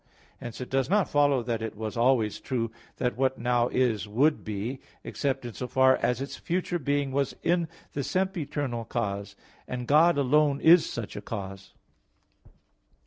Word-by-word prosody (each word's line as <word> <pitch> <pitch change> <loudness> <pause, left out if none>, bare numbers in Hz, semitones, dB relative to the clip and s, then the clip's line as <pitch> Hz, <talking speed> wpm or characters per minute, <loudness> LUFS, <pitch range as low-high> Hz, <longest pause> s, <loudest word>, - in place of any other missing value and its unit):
Hence 120 -1 -7
it 125 - -7
does 135 +1 +1
not 205 0 +2
follow 145 -3 +3
that 115 -1 -2
it 110 -2 -5
was 110 -1 -4
always 115 -3 +2
true 115 -4 -2 0.3
that 125 -1 -1
what 130 0 +1
now 120 0 +1
is 120 -5 0
would 140 +9 +2
be, 110 +5 -4 0.2
except 135 -2 -2
in 120 - -6
so 125 - -5
far 130 +1 +4
as 125 0 0
its 135 +1 -5
future 175 0 -2
being 140 -1 0
was 140 0 -1
in 170 -1 +2 0.3
the 140 - -2
sempiternal 145 -7 -2
cause; 100 -4 -3 0.3
and 125 -1 -4
God 155 +4 +5
alone 140 +1 +3
is 165 +1 +6
such 115 -3 -5
a 105 - -5
cause. 95 -3 -7
130 Hz, 165 wpm, -27 LUFS, 115-145 Hz, 0.3 s, is